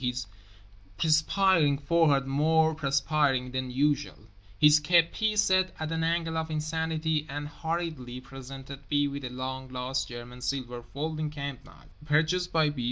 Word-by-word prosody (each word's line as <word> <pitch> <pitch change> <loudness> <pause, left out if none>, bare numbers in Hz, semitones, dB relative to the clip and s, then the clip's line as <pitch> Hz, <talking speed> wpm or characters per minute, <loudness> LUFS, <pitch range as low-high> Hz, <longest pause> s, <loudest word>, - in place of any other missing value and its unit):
(his 125 -1 -2 0.7
perspiring 155 - +3
forehead 145 -2 +3
more 160 +3 +3
perspiring 140 -3 +1
than 130 0 -3
usual, 145 +3 0 0.4
his 150 +5 +6
kepi 175 +7 +2
set 185 -2 +3
at 155 0 -3
an 165 0 -1
angle 165 0 0
of 160 0 -4
insanity) 160 0 -1
and 145 +1 -4
hurriedly 155 -5 -4
presented 135 +1 -9
B. 145 -1 +2
with 140 0 -5
a 125 - -4
long 130 +1 -5
lost 130 +1 -2
German 120 +1 -9
silver 125 -1 -3
folding 155 +5 -4
camp 140 -3 -6
knife, - - -18
purchased 160 +4 +1
by 155 -2 +3
B. 145 - -12
150 Hz, 145 wpm, -28 LUFS, 130-160 Hz, 0.7 s, his